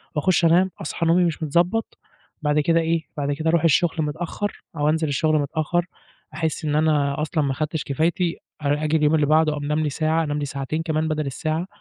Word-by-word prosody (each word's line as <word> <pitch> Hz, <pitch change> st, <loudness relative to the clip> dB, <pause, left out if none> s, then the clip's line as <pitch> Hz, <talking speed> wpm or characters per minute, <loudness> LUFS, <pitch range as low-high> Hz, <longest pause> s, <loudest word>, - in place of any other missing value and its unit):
وأخُش 170 Hz, +3 st, +2 dB
انام، 180 Hz, +3 st, +4 dB
أصحى، 165 Hz, +1 st, -3 dB
نومي 175 Hz, +2 st, +4 dB
مش 165 Hz, -1 st, -2 dB
متضبّط، 175 Hz, +9 st, 0 dB, 0.4 s
بعد 150 Hz, 0 st, +2 dB
كده 165 Hz, +2 st, +3 dB
إيه، 165 Hz, 0 st, 0 dB
بعد 145 Hz, 0 st, -1 dB
كده 160 Hz, +3 st, -1 dB
أرُوح 170 Hz, 0 st, +2 dB
الشغل 165 Hz, +1 st, +3 dB
متأخّر 165 Hz, +7 st, -3 dB
أو 145 Hz, +1 st, +2 dB
أنزِل 160 Hz, 0 st, +1 dB
الشغل 155 Hz, +2 st, +1 dB
متأخّر، 155 Hz, +4 st, -1 dB, 0.5 s
أحس 160 Hz, 0 st, -2 dB
إن 150 Hz, 0 st, 0 dB
أنا 150 Hz, -2 st, +1 dB
أصلًا 155 Hz, 0 st, 0 dB
ما 135 Hz, -1 st, 0 dB
خَدتش 155 Hz, +2 st, -2 dB
كفايتي، 165 Hz, +4 st, 0 dB, 0.2 s
آ 145 Hz, +1 st, 0 dB
آجي 155 Hz, +1 st, +2 dB
اليوم 150 Hz, +1 st, +3 dB
اللي 150 Hz, -2 st, +3 dB
بَعده 155 Hz, 0 st, +3 dB
أنام 150 Hz, +2 st, -1 dB
لي 155 Hz, -1 st, 0 dB
ساعة، 160 Hz, +2 st, 0 dB
أنام 150 Hz, -1 st, -2 dB
لي 145 Hz, -, -2 dB
ساعتين 140 Hz, +3 st, -3 dB
كمان 160 Hz, -1 st, -1 dB
بدَل 155 Hz, -1 st, -1 dB
الساعة 155 Hz, +6 st, -2 dB
155 Hz, 200 wpm, -23 LUFS, 150-165 Hz, 0.5 s, انام